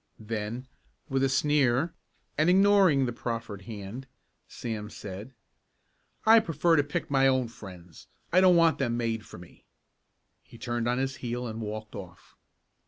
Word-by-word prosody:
Then 110 +3 -5 0.4
with 135 0 +1
a 135 - +3
sneer, 145 +2 +2 0.4
and 155 +3 +3
ignoring 190 -7 +5
the 120 - -3
proffered 115 -4 -5
hand, 110 +5 -7 0.4
Sam 110 -3 -5
said: 100 +4 -8 0.9
"I 225 +1 +8
prefer 165 -3 +2
to 145 - +4
pick 145 0 -4
my 135 -1 +4
own 130 -3 +2
friends. 90 -7 -12 0.3
I 185 - +6
don't 185 -1 +6
want 165 -1 +4
them 120 -3 0
made 115 -2 -2
for - - -11
me." 85 0 -15 0.8
He 115 - -15
turned 120 -1 -2
on 120 +1 +1
his 135 0 -2
heel 120 0 -4
and 115 -1 -5
walked 110 0 -6
off. 95 -4 -11
120 Hz, 155 wpm, -28 LUFS, 110-145 Hz, 0.9 s, I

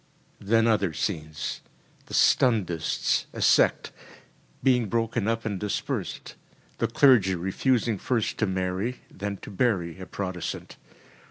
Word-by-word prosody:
‚ÄĚ 100 - -13
Then 115 +1 +4
other 100 -7 +2
scenes. 80 -3 -3 0.5
The - - -5
Stundists 90 -10 +2
a - - -7
sect - - +3 0.7
being 125 -4 +3
broken 115 -1 0
up 115 0 -1
and 100 -4 -2
dispersed; 105 0 -3 0.5
the - - +1
clergy 115 -9 +4
refusing 110 +5 0
first 120 -4 -1
to 110 - +2
marry, 95 +6 -2
then 100 0 -5
to - - -8
bury 95 -6 0
a 95 - -8
Protestant. 95 -3 -5
100 Hz, 125 wpm, -26 LUFS, 90-115 Hz, 0.7 s, Then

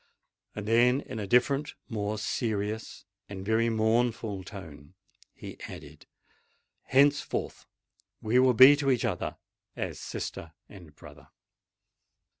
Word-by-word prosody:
Then, 120 +5 +2
in 125 -5 -7
a 100 - -4
different—more 120 -4 0
serious—and 105 -3 -5
very 110 +2 +2
mournful 110 -2 0
tone, 80 -5 -11 0.4
he - - -10
added, - - -12 0.8
"Henceforth 145 +2 +1 0.5
we 115 +4 +2
will 130 -1 +4
be 130 +4 +9
to 140 -2 0
each 125 -3 +1
other - - -3 0.4
as - - -5
sister 80 -1 -6
and 85 -7 -14
brother." - - -15
110 Hz, 100 wpm, -28 LUFS, 100-125 Hz, 0.8 s, be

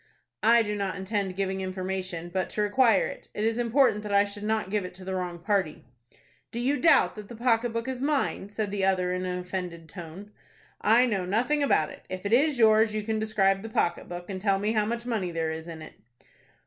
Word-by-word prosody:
"I 230 +2 +5
do 210 -1 -3
not 200 -2 -2
intend 190 0 -2
giving 190 0 -2
information, 185 -2 -4
but 185 -1 -1
to 210 - -1
require 220 -1 +4
it. - - -8
It 210 - -2
is 225 +1 +1
important 240 -2 +3
that 210 -1 -6
I 200 0 +5
should 205 0 -8
not 215 -2 -1
give 210 -2 0
it 180 0 -8
to 185 0 -9
the 190 - -3
wrong 180 -2 -3
party." 180 - -1 0.6
"Do 235 - -5
you 270 +4 +1
doubt 325 - +5
that 210 -2 -9
the 235 - -9
pocket 235 0 +1
book 230 +2 -3
is 260 -1 -4
mine?" 280 -8 0
said 210 -1 -3
the 200 -1 -2
other, 185 -1 +2
in 185 0 -2
an 180 0 -2
offended 180 -2 -5
tone. 180 +4 -10 0.5
"I 230 +4 +5
know 205 -6 -1
nothing 245 +10 +1
about 160 - +2
it. - - -13
If 185 +1 -6
it 200 - 0
is 285 +3 +4
yours 220 -1 +4
you 215 - -1
can 220 0 -1
describe 195 -3 +2
the 225 - -7
pocket 175 -5 -1
book, 175 0 -7
and 190 -2 -5
tell 195 -1 +2
me 205 +2 0
how 215 -2 +1
much 235 +1 -3
money 220 -7 -1
there 165 -1 -2
is 160 +1 -6
in 160 -2 -8
it." - - -11
205 Hz, 230 wpm, -27 LUFS, 185-225 Hz, 0.6 s, I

